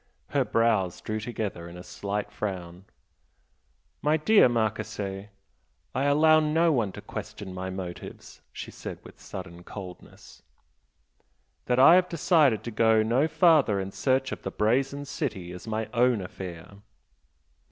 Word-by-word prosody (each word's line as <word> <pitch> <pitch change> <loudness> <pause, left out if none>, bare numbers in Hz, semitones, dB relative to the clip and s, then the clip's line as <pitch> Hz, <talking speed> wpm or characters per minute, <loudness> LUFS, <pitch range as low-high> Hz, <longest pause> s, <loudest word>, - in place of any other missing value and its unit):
Her - - +2
brows 110 -6 +1
drew 110 0 -4
together 105 -6 -5
in 85 - -10
a 90 - -9
slight 105 +2 -4
frown. 95 -3 -5 1.2
"My 150 +2 +2
dear 160 - +5
Marchese, 105 -3 -2 0.6
I 130 - 0
allow 155 +2 +5
no 160 +2 +2
one 115 -9 +1
to - - -8
question 95 -2 -7
my 95 0 -5
motives" 90 -2 -8
she - - -8
said - - -7
with - - -15
sudden 85 +1 -9
coldness 90 -1 -11 1.2
"That 125 - +1
I 135 +5 +8
have 180 0 +4
decided 155 - +3
to 120 - -5
go 110 0 +4
no 125 +7 +2
farther 155 - +4
in 95 0 -4
search 130 +3 0
of - - -5
the - - -4
Brazen 135 +6 0
City 110 - -4
is 90 +4 -10
my 110 0 -2
own 120 -1 +3
affair." 90 0 -8
110 Hz, 140 wpm, -27 LUFS, 95-140 Hz, 1.2 s, I